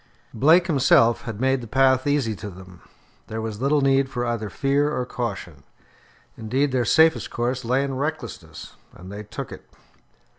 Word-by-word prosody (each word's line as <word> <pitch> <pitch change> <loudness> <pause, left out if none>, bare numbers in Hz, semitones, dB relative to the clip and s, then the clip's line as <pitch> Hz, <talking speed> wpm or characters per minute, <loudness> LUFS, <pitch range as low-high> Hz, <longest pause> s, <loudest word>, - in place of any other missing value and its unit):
Blake 160 +9 +4
himself 125 -7 +3
had 110 -3 -6
made 130 0 +1
the 115 - -8
path 130 +2 +2
easy 140 -7 0
to 105 - -7
them. 90 -2 -13 0.5
There 110 - -5
was 110 0 -5
little 140 +2 +2
need 135 0 +2
for 125 -2 -3
either 115 -3 -3
fear 140 +7 0
or 125 -4 -2
caution. 95 - -5 0.7
Indeed, 130 +6 -1
their 125 -2 0
safest 160 +8 +3
course 125 +2 -2
lay 130 +4 +1
in 140 -1 -3
recklessness, 130 - -6 0.2
and 90 +2 -11
they 105 +1 -7
took 105 - -8
it. - - -12
125 Hz, 170 wpm, -23 LUFS, 110-135 Hz, 0.7 s, Blake